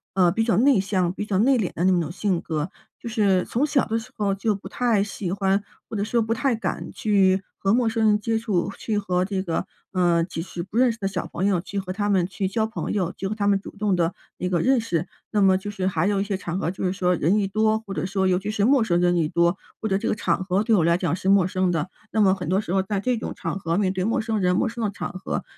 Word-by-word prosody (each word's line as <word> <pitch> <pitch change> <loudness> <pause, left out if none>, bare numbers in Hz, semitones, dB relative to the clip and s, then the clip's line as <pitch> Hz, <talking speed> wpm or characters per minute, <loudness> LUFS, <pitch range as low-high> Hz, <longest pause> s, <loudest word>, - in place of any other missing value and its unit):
呃， 180 -2 +4
比 225 - +1
较 225 -1 +2
内 260 0 +5
向、 185 -2 0
比 210 +2 -5
较 195 - 0
内 250 +5 +4
敛 190 - -1
的 170 - -1
那 190 - +4
种 160 -1 -4
性 185 -1 -1
格。 160 +2 -3 0.3
就 - - -8
是 205 -5 +2
从 270 +6 0
小 280 -2 +2
的 225 +1 -1
时 235 +3 -11
候 205 -2 +1
就 205 +2 0
不 195 - -9
太 235 -5 +1
喜 200 -3 -4
欢， 195 +1 +1 0.2
或 - - -7
者 200 - 0
说 230 +2 +1
不 225 +1 0
太 235 +2 +1
敢 220 - -4
去 195 -3 +2 0.2
和 195 - +1
陌 240 +1 +3
生 225 0 0
人 210 0 +4
接 225 +1 0
触， 200 -6 -1
去 215 -2 -1
和 180 -3 0
这 190 -1 -2
个， 175 +1 -2 0.3
嗯， 175 -2 +2
即 165 - -5
使 170 0 -6
不 195 - -13
认 250 +1 +4
识 225 - -8
的 195 - -2
小 190 -2 -3
朋 180 - -3
友 190 -4 +2
去 200 +3 -7
和 185 -1 -3
他 205 +1 -1
们 190 -3 +3
去 190 +1 -2
交 220 +3 0
朋 220 +1 -4
友， 185 -4 -1
就 190 - -4
和 215 - -3
他 205 -2 -1
们 200 -1 +3
主 - - -9
动 205 -2 +1
地 170 0 +1 0.3
一 180 - -1
个 175 -2 +1
认 260 -2 +3
识。 175 -6 -2 0.2
那 210 - 0
么 190 -1 +5
就 190 +2 -3
是 195 -2 -3
还 180 -1 +1
有 200 -1 +1
一 - - +1
些 200 -1 -2
场 180 -2 -4
合， 175 -3 -1
就 185 - -6
是 180 - +1
说， 180 -2 +1
人 175 +5 +2
一 205 - +1
多， 215 +2 +2
或 195 - -6
者 160 0 -2
说， 190 0 0
尤 180 -1 +2
其 200 +2 -5
是 210 -1 +1
陌 265 0 +4
生 175 -5 +1
人 175 0 +3
一 165 -2 +2
多， 170 +2 +2 0.2
或 220 - -2
者 195 -2 +1
这 - - -3
个 - - +1
场 215 - 0
合 190 +2 +1
对 220 0 +3
我 175 - +3
来 170 +1 +3
讲 170 -3 0
是 190 +1 -2
陌 195 -2 +5
生 185 0 0
的。 170 0 -1 0.2
那 220 - +2
么 190 -2 +5
很 180 -4 -4
多 190 +2 +2
时 205 -4 -3
候， 190 - +3
在 195 +1 -2
这 245 +4 0
种 - - -5
场 195 - -4
合 165 -2 -1
面 190 -2 +1
对 185 -1 -1
陌 225 +4 +1
生 220 -1 -1
人、 180 -1 +2
陌 250 - +2
生 235 0 -4
的 210 - +1
场 205 - -5
合， 185 0 -4
195 Hz, 315 characters per minute, -24 LUFS, 180-215 Hz, 0.3 s, 内